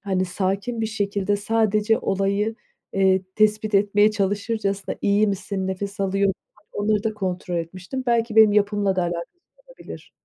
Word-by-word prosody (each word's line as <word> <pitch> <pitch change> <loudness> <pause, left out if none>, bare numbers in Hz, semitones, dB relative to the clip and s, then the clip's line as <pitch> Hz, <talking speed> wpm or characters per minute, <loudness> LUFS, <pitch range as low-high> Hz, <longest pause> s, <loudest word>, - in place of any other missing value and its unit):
hani, 190 -2 -1
sakin 195 +6 -2
bir 220 - 0
şekilde 205 -1 -1
sadece 215 +1 +1
olayı, 200 +3 0 0.4
eee, 190 -1 +3
tespit 215 0 +2
etmeye 205 +1 +4
çalışırcasına 200 0 -2
"İyi 205 +1 +3
misin, 195 -1 -3
nefes 200 +2 -4
alıyor 195 +1 +1
musun?" 190 - -4 0.3
onları 210 +1 0
da 220 - -1
kontrol 180 -3 -3
etmiştim. 185 +9 -5
Belki 230 -1 +1
benim 220 -2 +7
yapımla 205 -2 +1
da 180 - +2
alakası 170 -1 -3 0.4
olabilir. - - -11
200 Hz, 145 wpm, -23 LUFS, 190-215 Hz, 0.4 s, benim